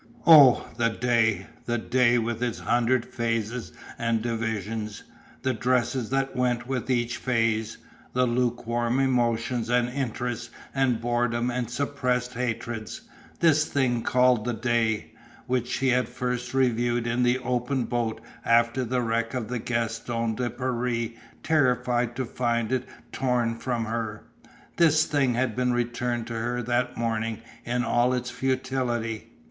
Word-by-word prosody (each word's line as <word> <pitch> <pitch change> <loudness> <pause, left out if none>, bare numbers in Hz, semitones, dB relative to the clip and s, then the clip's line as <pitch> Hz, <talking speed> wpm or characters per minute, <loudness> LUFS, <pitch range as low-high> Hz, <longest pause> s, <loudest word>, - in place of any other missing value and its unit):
Oh, 145 -7 +8
the 115 -1 +2
day, 115 -4 +1 0.2
the 120 0 +1
day 120 +1 +3
with 115 0 -2
its 120 -2 -1
hundred 120 +1 +1
phases 115 0 -2 0.3
and 115 -1 +1
divisions, 110 -2 -3 0.4
the 130 - +1
dresses 125 0 0
that 135 +1 -1
went 125 -1 0
with 130 -1 -3
each 120 -2 0
phase, 115 -3 0 0.4
the 125 0 +3
lukewarm 120 0 0
emotions 120 -2 +1
and 120 0 +3
interests 125 -2 -3 0.2
and 130 -4 +2
boredom 120 0 0
and 120 -1 -2
suppressed 125 -2 -1
hatreds, 115 -2 -4 0.4
this 155 -2 +5
thing 125 -4 +1
called 125 -2 +3
the 120 0 -2
day, 115 -2 0 0.3
which 125 -1 0
she 135 - 0
had 125 -1 +2
first 125 0 -3
reviewed 120 -2 +2
in 120 +1 0
the 125 +1 +3
open 125 +1 -1
boat 115 -2 -2 0.2
after 115 +2 +3
the 125 +1 -1
wreck 115 +1 -1
of 120 -3 -3
the 125 -1 -2
Gaston 115 0 -2
de 120 +2 -2
Paris 120 -2 -1 0.3
terrified 125 -5 +2
to 130 +1 -2
find 120 -1 -1
it 130 -1 0 0.3
torn 125 -3 0
from 120 -1 -2
her 110 -1 -4 0.5
this 160 -2 +5
thing 135 -5 +1
had 125 -2 0
been 125 0 +1
returned 120 0 -1
to 120 - -6
her 120 +2 -2
that 120 +1 0
morning 115 -1 -1 0.3
in 120 +1 0
all 125 +1 +2
its 125 -1 -3
futility. 125 -4 -2
120 Hz, 140 wpm, -26 LUFS, 115-125 Hz, 0.5 s, Oh